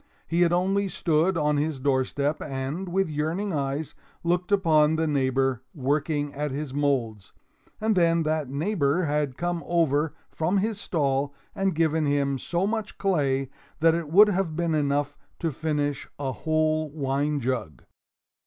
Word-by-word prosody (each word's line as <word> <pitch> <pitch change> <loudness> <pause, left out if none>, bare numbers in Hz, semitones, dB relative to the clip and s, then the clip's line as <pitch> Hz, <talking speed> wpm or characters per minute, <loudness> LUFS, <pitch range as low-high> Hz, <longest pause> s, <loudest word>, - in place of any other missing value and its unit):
He 170 +1 0
had 170 -1 +4
only 195 +3 +1
stood 170 0 +1
on 150 -1 +2
his 150 -1 -1
doorstep 140 +2 0
and, 140 +7 -4
with 190 +1 +1
yearning 160 +6 -2
eyes, 140 +1 -2 0.3
looked 175 +2 0
upon 160 -6 +4
the 160 0 +1
neighbor 135 -3 +1
working 145 +1 -1
at 150 +1 -2
his 140 0 -4
molds, 130 -8 -1 0.5
and 220 0 +1
then 170 -2 +3
that 155 -3 -1
neighbor 155 +1 0
had 145 -4 -1
come 175 -1 -2
over 160 -3 +1 0.2
from 175 +5 0
his 210 +1 -1
stall 140 -3 0 0.2
and 195 -3 0
given 160 -1 +2
him 140 -1 +1
so 175 +8 -1
much 215 0 -3
clay 135 -8 0 0.3
that 165 +1 +5
it 165 -2 -2
would 205 +6 +7
have 185 -5 -1
been 170 -1 0
enough 145 -1 0 0.2
to 165 - -1
finish 145 -1 -2
a 135 -2 -2
whole 155 +2 0
wine 145 0 -1
jug. 120 - -3
155 Hz, 155 wpm, -26 LUFS, 140-170 Hz, 0.5 s, would